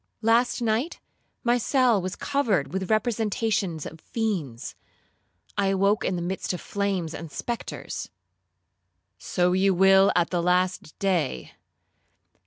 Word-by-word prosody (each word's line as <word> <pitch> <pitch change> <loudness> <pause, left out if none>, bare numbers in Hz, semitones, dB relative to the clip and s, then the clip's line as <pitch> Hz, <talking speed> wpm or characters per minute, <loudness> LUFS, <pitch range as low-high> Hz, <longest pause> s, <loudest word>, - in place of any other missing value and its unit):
Last 235 +2 +3
night, 235 +9 0 0.4
my 240 +1 +3
cell 245 -3 +3
was 185 0 -4
covered 230 - 0
with 190 -1 -2
representations 215 - 0
of 160 0 -9
fiends. 180 - -3 0.9
I 200 - +2
awoke 195 +2 +2
in 185 - 0
the 175 - -3
midst 185 +1 -2
of 180 - -4
flames 195 -5 -2
and 160 0 -7
spectres.'—'So 180 -4 -5
you 190 0 +3
will 195 +1 +6
at 175 -1 +2
the 175 -2 +1
last 180 -2 0
day!' 170 - -1
195 Hz, 120 wpm, -26 LUFS, 180-220 Hz, 0.9 s, will